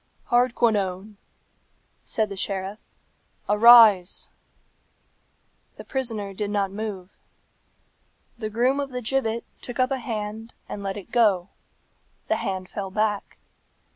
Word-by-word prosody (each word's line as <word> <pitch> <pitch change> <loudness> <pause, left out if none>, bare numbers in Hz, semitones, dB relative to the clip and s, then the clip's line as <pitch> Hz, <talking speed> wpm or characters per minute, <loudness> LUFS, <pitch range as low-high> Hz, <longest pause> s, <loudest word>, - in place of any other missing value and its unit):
"Hardquanonne," 215 -5 +1 0.9
said 215 -2 0
the 200 - -6
sheriff, 195 +2 -4 0.7
"arise!" 210 -4 +6 1.5
The - - -10
prisoner 225 -7 -3
did 205 +1 -3
not 200 -2 0
move. 200 -3 -6 1.2
The 220 -3 -5
groom 250 +6 +1
of 280 -1 -2
the 250 -1 -5
gibbet 235 -1 -1 0.2
took 245 - -6
up 255 +1 +2
a 270 - -1
hand 220 -1 -5
and 205 - -6
let 195 0 -4
it 200 - -10
go; 205 -6 +3 0.8
the - - +2
hand 185 -1 -4
fell 195 0 -5
back. 210 0 -2
215 Hz, 115 wpm, -24 LUFS, 195-235 Hz, 1.5 s, arise